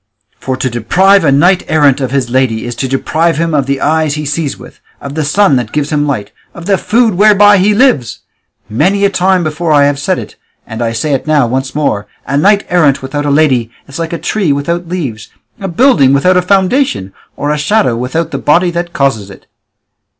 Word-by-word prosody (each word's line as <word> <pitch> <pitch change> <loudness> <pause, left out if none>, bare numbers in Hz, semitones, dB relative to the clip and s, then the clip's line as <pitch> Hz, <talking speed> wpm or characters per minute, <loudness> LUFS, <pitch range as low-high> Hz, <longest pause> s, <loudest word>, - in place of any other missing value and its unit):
For 130 -1 -4
to 130 - -2
deprive 180 - +2
a - - +3
knight 175 +7 +3
errant 145 -3 +2
of 130 - -2
his 135 -2 -1
lady 125 -3 0
is 120 - -5
to 135 - -2
deprive 160 +5 -1
him 165 0 -1
of 140 -3 0
the 140 0 -1
eyes 155 0 0
he 150 0 -5
sees 145 0 -3
with, - - -14 0.2
of 140 - -8
the 155 +1 -2
sun 150 0 +2
that 120 -3 -4
gives 150 0 -2
him 150 -1 0
light, 120 -8 -3 0.2
of 170 - -10
the 195 -1 +1
food 230 -1 +1
whereby 205 +1 +5
he 205 +3 +2
lives. 175 - +1 0.5
Many 185 - +1
a 200 - +1
time 185 -1 +1
before 155 0 -1
have 145 0 +2
I - - -12
said 145 - -1
it, - - -9 0.3
and 110 +1 -7
I 115 -1 -1
say 140 +6 -2
it 135 - -3
now 150 -4 +2
once 130 +3 -3
more, 105 -9 -1 0.2
a 135 - -3
knight 200 +7 +2
errant 145 -6 +1
without 145 +2 -3
a - - +1
lady 140 -6 +2 0.2
is 140 +3 -9
like 165 -1 -3
a 170 - -3
tree 190 -2 -1
without 170 +5 -2
leaves, 135 -12 -5 0.3
a 195 - -4
building 170 - +3
without 180 +7 +2
a 180 - +3
foundation, 190 - 0 0.2
or 145 +1 -2
a 150 - -1
shadow 175 - +1
without 150 +7 -3
the - - -4
body 175 +4 +2
that 170 0 -4
causes 115 -10 -1
it." 95 - -14
150 Hz, 215 wpm, -12 LUFS, 135-180 Hz, 0.5 s, whereby